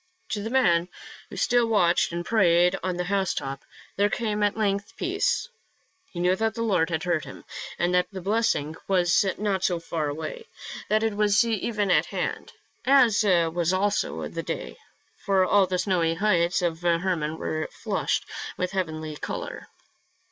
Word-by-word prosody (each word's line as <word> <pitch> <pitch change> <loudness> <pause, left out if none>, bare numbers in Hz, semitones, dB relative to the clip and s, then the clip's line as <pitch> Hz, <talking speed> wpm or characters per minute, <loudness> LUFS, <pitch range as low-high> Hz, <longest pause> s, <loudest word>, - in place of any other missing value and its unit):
To 205 - -2
the 220 - -4
man, 180 -9 +3 0.4
who - - -9
still 245 -1 +3
watched 180 -8 +3
and 175 0 -4
prayed 180 -4 +4
on 185 -1 -2
the 180 - -1
housetop, 180 -8 -2 0.3
there 205 +1 +3
came 210 -2 -2
at 205 +1 +1
length 205 0 -1
peace. 385 +6 0 0.6
He 175 - -8
knew 180 +1 +3
that 220 +1 0
the 230 - -2
Lord 185 -7 +2
had 160 -2 -2
heard 175 -3 0
him, - - -11 0.3
and 175 +1 +1
that 180 0 +3
the 195 - -6
blessing 190 -6 0
was 175 -4 +3
not 200 -3 -1
far 165 -3 -1
away, 160 - -5 0.4
that 215 +1 +2
it 220 -2 0
was 210 +1 +3
even 210 -3 -1
at - - +3
hand - - -4 0.2
— - - -41 0.2
as 220 -3 +2
was 175 -2 +2
also 205 +2 0
the - - -5
day, - - -5 0.5
for 195 -2 +3
all 195 0 +4
the 180 0 -1
snowy 175 -4 +1
heights 180 -2 +2
of 165 -1 -1
Hermon 170 -2 0
were 155 0 -3
flushed - - -2 0.3
with 180 - -2
heavenly 160 -5 -3
color. - - -6
185 Hz, 165 wpm, -26 LUFS, 170-210 Hz, 0.6 s, prayed